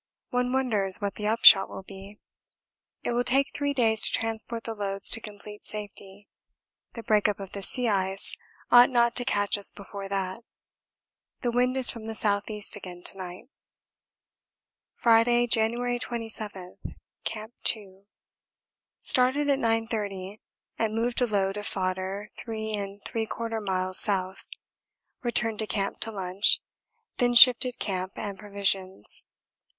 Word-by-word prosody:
One 250 0 0
wonders 215 -8 +1
what 200 -1 -3
the 210 - -4
upshot 215 -3 +7
will - - -8
be. 195 +1 -12 0.9
It - - -2
will 240 +1 +1
take 270 +3 +2
three 285 0 -1
days 225 -5 +2
to - - +4
transport 225 +1 -2
the 225 - -5
loads 200 -2 -1
to 225 - +2
complete 210 0 -11
safety; 205 -1 -9 0.7
the 230 - -8
break 210 -2 +2
up 205 -1 -2
of 195 -1 -8
the 200 - -7
sea 245 +5 +1
ice 195 -2 -1 0.4
ought 245 0 +8
not 235 -2 +2
to 245 - +8
catch 205 -4 0
us 200 - +8
before 200 -1 -9
that. 190 0 -3 1.0
The 240 - -1
wind 250 +2 +1
is 260 - +5
from 230 -2 -9
the 225 -1 -4
S.E. 210 0 -1
again 180 -3 -10
to - - -3
night. 180 -1 -8 1.5
Friday, 240 +1 +3
January 240 +2 +1
27. 220 -6 -7 0.4
Camp 220 +1 -5
2. 200 -2 +1 0.9
Started 270 +3 +2
at 275 - +1
9.30 215 -4 -2 0.4
and 220 -1 -1
moved 235 +2 -1
a 245 - +3
load 195 -2 -1
of 205 - -5
fodder 190 +2 -3
3 220 -2 -5 0.3
3/4 225 0 -3
miles 185 -1 0
south 190 -2 -1 0.7
returned 230 -3 +2
to 220 - -1
camp 200 -1 -2
to 225 - -3
lunch 190 0 +1 0.6
then 245 0 +1
shifted 250 +1 +7
camp 185 -1 -3
and 200 -2 -6
provisions. 195 - -2
215 Hz, 140 wpm, -26 LUFS, 195-235 Hz, 1.5 s, ought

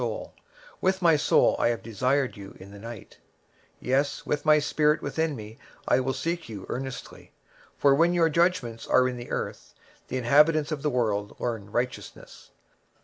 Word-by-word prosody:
23:026:009 - - -4 0.5
With 190 0 +1
my 165 -2 +6
soul 145 - +3
have 115 -1 +1
I - - -23
desired 125 +5 0
thee 100 -2 -10
in 100 +1 -12
the 100 - -11
night; 115 0 -10 0.6
yea, 130 +3 +2 0.2
with 150 - -2
my 155 0 +6
spirit 150 +1 +2
within 160 -2 -1
me 110 -1 -10 0.3
will 130 +1 +3
I - - 0
seek 170 +3 -3
thee 110 -3 -7
early: 130 0 -7 0.4
for 140 -1 +4
when 170 +5 +3
thy 165 -2 +4
judgments 160 -9 0
are 130 0 +4
in 125 -1 -4
the 120 - -8
earth, - - -5 0.3
the 130 - -3
inhabitants 150 +5 +4
of 150 -2 -3
the 150 - 0
world 105 -6 -1
will 120 - 0
learn 105 -3 -9
righteousness. 125 +2 -5
130 Hz, 175 wpm, -26 LUFS, 115-155 Hz, 0.6 s, my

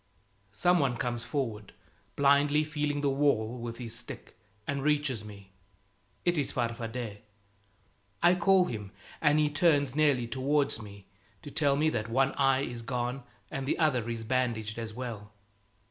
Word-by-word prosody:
Some 175 - +4
one 130 -5 +1
comes 120 0 -2
forward, 115 -8 -3 0.4
blindly 145 +2 +4
feeling 150 -1 -2
the 145 - +2
wall 125 -4 +1
with 115 0 -5
his 115 -3 -6
stick, - - -8 0.3
and 140 -1 -2
reaches 145 -6 +1
me. 100 -2 -12 0.7
It 175 -2 +2
is 140 - -1
Farfadet! 115 -2 -3 1.0
I 175 +1 +7
call 185 +1 +4
him, 105 - -6 0.3
and 150 -1 +4
he 150 -1 +2
turns 145 -4 +3
nearly 145 -5 +3
towards 135 +2 0
me 100 -2 -11 0.4
to 145 - -8
tell 140 -2 +2
me 155 +2 +2
that 110 -4 -2
one 135 +3 +2
eye 135 -1 +2
is 120 -3 -4
gone, 125 +2 -2 0.3
and 135 0 -4
the - - +1
other 130 -8 +1
is 115 -1 -4
bandaged 115 -3 -1
as 115 -1 -5
well. 110 -3 -7
130 Hz, 155 wpm, -30 LUFS, 115-145 Hz, 1.0 s, I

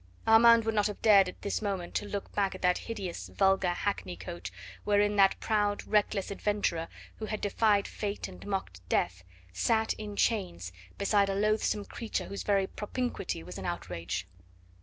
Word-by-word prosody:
Armand 230 0 +7
would 225 - 0
not 210 -1 +2
have 210 - -6
dared 200 -4 +7
at - - -12
this 200 - -1
moment 195 -4 -3
to 205 - -2
look 200 -1 -5
back 200 -2 0
at - - -10
that 180 0 +3
hideous, 185 - -5
vulgar 190 - +2
hackney 175 - -2
coach 85 -1 -7 0.3
wherein 205 0 +2
that 195 -1 +5
proud, 205 -2 0
reckless 205 -2 +1
adventurer, 200 -5 -1 0.3
who 220 - -4
had 215 -1 -3
defied 205 0 +2
Fate 205 -1 -4
and - - -11
mocked 190 - -3
Death, 90 0 0 0.3
sat, 220 - +1
in 210 -1 -6
chains, 180 - 0 0.3
beside 200 0 +2
a 195 - 0
loathsome 210 0 +1
creature 230 -2 -4
whose 200 - -5
very 200 -2 +2
propinquity 210 - -4
was 90 +3 -8
an 95 - -6
outrage. 85 0 -4
200 Hz, 170 wpm, -30 LUFS, 175-210 Hz, 0.3 s, Armand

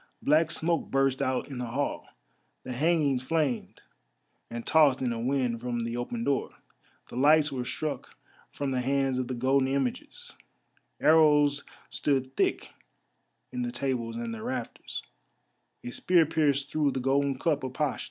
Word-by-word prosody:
Black 155 +2 +4
smoke 170 0 -1
burst 135 -1 +1
out 130 0 0
in 135 -3 -7
the 125 - -3
hall, 135 +5 -3 0.6
the 125 - -5
hangings 145 -2 +2
flamed 145 -2 -1 0.7
and 115 0 -6
tossed 150 -5 +4
in 125 -2 -1
a 115 - -4
wind 125 -2 0
from 120 -1 -2
the 115 0 -3
open 230 - -3
door. 140 -8 0 0.6
The - - -9
lights 150 +3 +4
were 130 -2 -3
struck 150 +4 -4 0.4
from 140 -1 -3
the 130 -1 0
hands 135 0 +1
of 130 - -2
the 130 - -3
golden 130 +2 +2
images, 135 -2 -3 0.7
arrows 150 -2 +4 0.3
stood 135 -2 -1
thick - - 0 0.8
in 125 - -3
the 120 0 -2
tables 120 -2 -2
and 115 0 -4
the 110 - -7
rafters, - - -5 0.8
a 120 - -5
spear 175 +4 +3
pierced 145 -3 +1
through 150 -3 +1
the 130 - -2
golden 135 +1 +1
cup 150 0 0
of 130 -1 -4
Pasht. 145 -1 -1
135 Hz, 160 wpm, -28 LUFS, 125-150 Hz, 0.8 s, Black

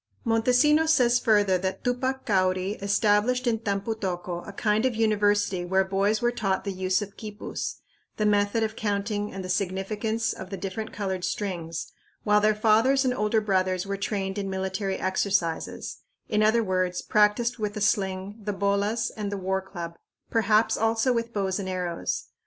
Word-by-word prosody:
Montesinos 250 +8 +3
says 245 -5 +4
further 205 -6 +3
that 190 +1 -3
Tupac 260 +2 -1
Cauri 185 -2 +1
established 210 +5 +2
in 230 -2 +1
Tampu 200 0 -1
tocco 180 -4 -4
a - - -6
kind 210 +2 +1
of 260 -3 +1
university 205 -4 +2
where 190 +2 +2
boys 200 +3 0
were 240 - +3
taught 195 -5 -1
the 200 - -3
use 185 +1 0
of 205 0 -11
quipus, 210 -1 -5 0.4
the 215 - +1
method 205 +2 +2
of 220 0 -2
counting 205 0 -2
and 190 -1 -6
the - - -4
significance 205 +4 -1
of 185 - -9
the 195 - -5
different 195 +4 -5
colored 190 -3 -3
strings, 175 -6 -3 0.3
while 210 0 +4
their 215 0 +3
fathers 225 +6 +3
and 255 - +2
older 215 -1 +1
brothers 185 -3 0
were 200 0 -2
trained 195 0 -2
in 195 -1 -3
military 190 +1 -2
exercises 185 -3 -1 0.3
in 210 - +1
other 220 +2 +4
words, 185 -2 -1
practiced 215 +3 +2
with 210 -1 -2
the - - -3
sling, 200 0 0
the 205 0 -2
bolas 200 +3 0
and 205 -2 -4
the 200 - -2
war 190 0 -1
club; 170 -3 -8 0.3
perhaps 220 -1 +3
also 225 +3 +2
with 230 0 -2
bows 195 -2 -1
and 190 -1 -4
arrows. 180 -2 -2
205 Hz, 170 wpm, -26 LUFS, 190-220 Hz, 0.4 s, says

